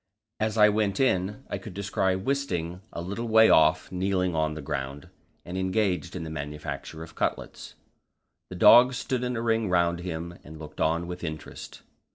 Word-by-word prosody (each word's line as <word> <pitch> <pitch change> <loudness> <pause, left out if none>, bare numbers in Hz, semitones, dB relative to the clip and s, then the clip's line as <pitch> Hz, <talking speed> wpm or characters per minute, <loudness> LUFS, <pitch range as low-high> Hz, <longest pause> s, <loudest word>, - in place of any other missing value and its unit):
As 110 0 -1
I 105 -1 +7
went 105 -2 0
in, 105 -1 0
I - - -4
could 110 -6 -10
descry 95 -1 0
Wisting 95 -7 -2
a 85 - -6
little 100 +6 -4
way 110 0 +6
off 80 +1 +4
kneeling 90 -1 0
on 80 -1 0
the 80 - -6
ground, 70 -1 -5 0.4
and 90 +1 -4
engaged 95 0 -1
in 90 - -4
the 80 - -6
manufacture 75 +1 -6
of 80 - -12
cutlets. - - -4 0.7
The 90 - -7
dogs 120 +6 +7
stood 125 0 -2
in 125 0 -2
a 115 - -3
ring 115 -3 +1
round 85 -1 +2
him, 85 -1 -6
and 80 +1 -11
looked 75 -1 -9
on 85 +2 +1
with 90 +1 -7
interest. 80 -2 -7
90 Hz, 180 wpm, -27 LUFS, 80-105 Hz, 0.7 s, I